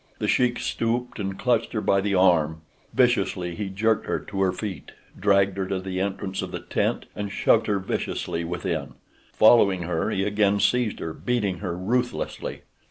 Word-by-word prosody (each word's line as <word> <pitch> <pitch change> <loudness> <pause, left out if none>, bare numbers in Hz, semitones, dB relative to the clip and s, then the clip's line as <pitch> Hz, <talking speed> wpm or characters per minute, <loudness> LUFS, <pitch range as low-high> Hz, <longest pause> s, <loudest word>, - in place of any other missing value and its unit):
The - - -2
Sheik 125 -1 +2
stooped 120 +1 -2
and 95 -1 -3
clutched 120 -3 +1
her 110 - 0
by 100 -2 +2
the 100 0 0
arm. 80 -4 +3 0.3
Viciously 95 -8 +1
he 100 +3 -4
jerked 110 +3 0
her - - 0
to 100 -2 -5
her 95 -1 +3
feet, 95 -6 -6 0.2
dragged 100 0 +2
her 95 -1 -1
to 95 0 -1
the 95 0 -4
entrance 95 0 -2
of - - -4
the - - -5
tent, - - -1
and 100 -1 -4
shoved - - +3
her 105 - +2
viciously 90 -3 -3
within. 85 -4 -3 0.4
Following 100 -5 +5
her 85 -1 -1
he 95 - 0
again 105 0 +2
seized 110 +2 +2
her, 80 - -4
beating 105 -7 -1
her 90 -4 -4
ruthlessly. 120 +7 -2
100 Hz, 175 wpm, -25 LUFS, 95-110 Hz, 0.4 s, Following